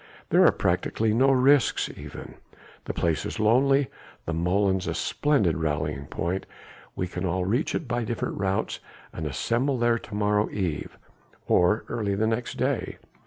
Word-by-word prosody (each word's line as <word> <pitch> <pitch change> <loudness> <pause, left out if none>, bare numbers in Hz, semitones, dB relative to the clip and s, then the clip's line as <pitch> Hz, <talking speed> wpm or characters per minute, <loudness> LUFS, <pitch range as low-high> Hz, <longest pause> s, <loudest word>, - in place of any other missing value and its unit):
There - - +6
are - - +6
practically 110 -1 0
no 130 +4 +4
risks 135 +1 +4
even. - - -9 0.5
The - - -3
place 80 -2 0
is - - -5
lonely, 135 +5 +4 0.4
the 85 - -2
molens 95 +3 +1
a 85 - -2
splendid 100 - +1
rallying 75 -3 -2
point. 85 +7 -3 0.5
We 90 - -1
can 90 - -5
all 90 0 0
reach 120 - 0
it 160 - -3
by 120 0 -1
different 115 -2 -3
routes 95 0 -1 0.3
and 80 - -4
assemble 120 - 0
there 120 0 +2
to 105 - -9
morrow 105 0 +1
eve 90 -7 -3 0.5
or 90 +5 +3
early 100 -4 -1
the 110 +2 +1
next 115 +2 -2
day. - - -1
105 Hz, 160 wpm, -26 LUFS, 90-120 Hz, 0.5 s, There